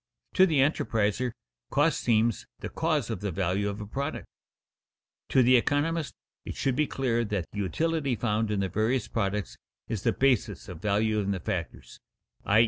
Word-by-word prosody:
To 190 Hz, 0 st, +6 dB
the 155 Hz, -6 st, +3 dB
enterpriser, 120 Hz, -4 st, +1 dB, 0.4 s
cost 150 Hz, +3 st, +2 dB
seems 115 Hz, -1 st, +2 dB
the -, -, -6 dB
cause 155 Hz, -8 st, 0 dB
of 115 Hz, -, -3 dB
the 100 Hz, -, -1 dB
value 95 Hz, +3 st, 0 dB
of 100 Hz, +1 st, -5 dB
a 105 Hz, -, -5 dB
product. 140 Hz, +8 st, -4 dB, 1.0 s
To 130 Hz, -, +5 dB
the 125 Hz, +2 st, +6 dB
economist 150 Hz, +5 st, 0 dB, 0.3 s
it -, -, -6 dB
should 135 Hz, -2 st, 0 dB
be 150 Hz, +1 st, +2 dB
clear 120 Hz, -3 st, 0 dB
that 100 Hz, -5 st, -2 dB
the 105 Hz, -, -5 dB
utility 145 Hz, -, 0 dB
found 110 Hz, -1 st, 0 dB
in 105 Hz, -2 st, 0 dB
the 95 Hz, -, -1 dB
various 110 Hz, +5 st, 0 dB
products 105 Hz, -2 st, -2 dB, 0.3 s
is 110 Hz, -4 st, -3 dB
the -, -, +2 dB
basis 130 Hz, -7 st, +1 dB
of 90 Hz, -4 st, -8 dB
value 105 Hz, +1 st, +1 dB
in 100 Hz, -1 st, -1 dB
the 100 Hz, -2 st, 0 dB
factors, -, -, -5 dB, 0.5 s
_i. 105 Hz, +2 st, +5 dB
115 Hz, 175 wpm, -28 LUFS, 105-135 Hz, 1.0 s, To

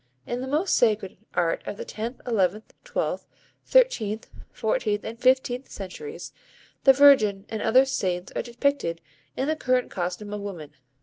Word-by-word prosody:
In 240 Hz, -, -3 dB
most -, -, -6 dB
of 300 Hz, +2 st, +3 dB
the -, -, -12 dB
sacred 215 Hz, -5 st, +2 dB, 0.2 s
art 165 Hz, -1 st, +1 dB
of -, -, -4 dB
the -, -, -6 dB
tenth, 230 Hz, +4 st, -6 dB
eleventh, 210 Hz, -2 st, 0 dB
twelfth, -, -, -3 dB, 0.4 s
thirteenth, 230 Hz, -, +2 dB, 0.2 s
fourteenth 215 Hz, -2 st, -1 dB
and 230 Hz, +2 st, -7 dB
fifteenth 255 Hz, 0 st, +2 dB
centuries, 435 Hz, -, -8 dB, 0.5 s
the 270 Hz, -, +10 dB
Virgin 220 Hz, -8 st, +5 dB
and 220 Hz, -1 st, -4 dB
other 255 Hz, +4 st, +5 dB
saints 185 Hz, -9 st, -2 dB
are -, -, 0 dB
depicted 240 Hz, -8 st, -1 dB, 0.4 s
in 265 Hz, -, 0 dB
the 310 Hz, -, +1 dB
current 255 Hz, -4 st, 0 dB
costume 185 Hz, +3 st, -4 dB
of 210 Hz, -, -4 dB
woman. 175 Hz, -8 st, -7 dB
225 Hz, 160 wpm, -25 LUFS, 200-265 Hz, 0.5 s, the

